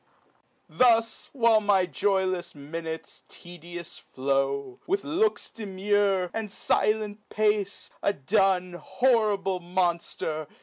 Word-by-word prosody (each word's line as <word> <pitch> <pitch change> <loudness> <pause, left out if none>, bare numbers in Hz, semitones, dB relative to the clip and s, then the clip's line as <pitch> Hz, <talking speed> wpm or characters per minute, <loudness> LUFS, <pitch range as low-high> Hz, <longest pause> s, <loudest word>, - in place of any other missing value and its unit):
Thus, 230 -2 +2
while 230 -5 +4
my 200 -3 +3
joylefs 185 +1 -1
minutes 160 +3 -7
tedious 175 0 -10
flow, 135 0 -2
With 395 +3 0
looks 385 +8 0
demure, 200 -2 0
and 220 -2 -3
filent 215 +1 0
pace, 210 -2 0
a - - +2
Dun, 185 +2 +1
Horrible 200 - +1
monfter 170 -3 -2
190 Hz, 95 wpm, -27 LUFS, 170-215 Hz, -, while